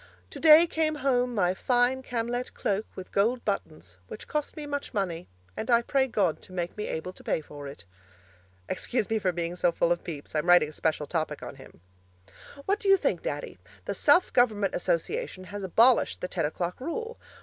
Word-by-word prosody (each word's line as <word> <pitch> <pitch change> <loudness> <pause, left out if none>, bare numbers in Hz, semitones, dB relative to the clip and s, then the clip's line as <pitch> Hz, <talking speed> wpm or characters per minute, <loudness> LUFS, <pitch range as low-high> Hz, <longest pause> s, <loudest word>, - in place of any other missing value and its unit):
'Today 315 +1 +7
came 315 -2 0
home 250 -2 +2
my 180 -3 +2
fine 245 +5 +1
Camlett 245 0 -3
cloak 205 +1 -1
with 185 - -9
gold 230 +5 +1
buttons, 155 - -4
which - - -9
cost 300 0 -3
me 300 - -5
much 285 -4 -4
money, 180 -4 -2 0.3
and 220 - -5
I 235 -1 +4
pray 265 +1 +1
God 195 -9 0
to - - -13
make 175 -1 -4
me 210 - -4
able 170 +3 -4
to - - -15
pay - - 0
for 145 -2 -10
it.' 140 -11 -10 0.8
Excuse 235 -4 -2
me 220 - +2
for 185 -3 +1
being 170 0 -3
so 175 -1 +2
full 170 0 +1
of 175 - 0
Pepys; 150 -4 -7
I'm 155 +2 -1
writing 175 -4 +6
a - - -10
special 155 -1 -1
topic 160 0 -3
on - - -8
him. - - -15 0.8
What 400 +2 +1
do 400 - -1
you 390 - +7
think, 245 - 0
Daddy? 145 -9 -5 0.3
The - - -2
Self 290 - +4
Government 215 -5 +2
Association 185 - -2
has 205 +2 -7
abolished 230 +7 +4
the - - -2
ten 170 -4 -1
o'clock 175 +6 -4
rule. 455 - -4
205 Hz, 195 wpm, -27 LUFS, 170-255 Hz, 0.8 s, Today